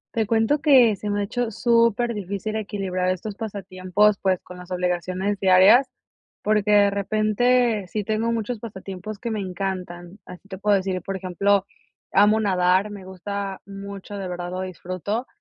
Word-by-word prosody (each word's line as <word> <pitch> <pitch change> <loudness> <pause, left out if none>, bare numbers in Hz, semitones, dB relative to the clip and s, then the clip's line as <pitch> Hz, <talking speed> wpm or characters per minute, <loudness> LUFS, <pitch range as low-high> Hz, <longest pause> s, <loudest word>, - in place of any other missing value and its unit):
Te 220 -2 +1
cuento 225 +7 +2
que 255 -9 +5
se 210 - -5
me 205 0 0
ha - - 0
hecho 235 +3 -2
superdifícil 220 -3 +1
equilibrar 190 -3 -2
estos 195 +3 -5
pasatiempos, 200 -1 0
pues, 190 -2 +1
con 180 - -11
las 180 0 -11
obligaciones 185 +2 -1
diarias, 195 +8 +6 0.5
porque 210 -1 +1
de 205 -1 +6
repente 215 +2 +1
sí 210 +3 -3
tengo 220 +2 -1
muchos 230 +1 -3
pasatiempos 195 -1 -8
que 235 +1 -4
me 215 - -2
encantan. 185 -1 -5
Así 180 +2 -13
te 190 - -6
puedo 205 +1 +2
decir, 190 -1 -1
por 195 +3 -5
ejemplo, 190 +2 +1 0.5
amo 210 +2 +4
nadar. 185 0 +2
Me 200 -2 -9
gusta 195 +1 -5
mucho, 200 +1 -8
de 195 -2 -4
verdad 175 0 -5
lo 185 - -4
disfruto. 185 +5 -4
200 Hz, 160 wpm, -23 LUFS, 185-215 Hz, 0.5 s, diarias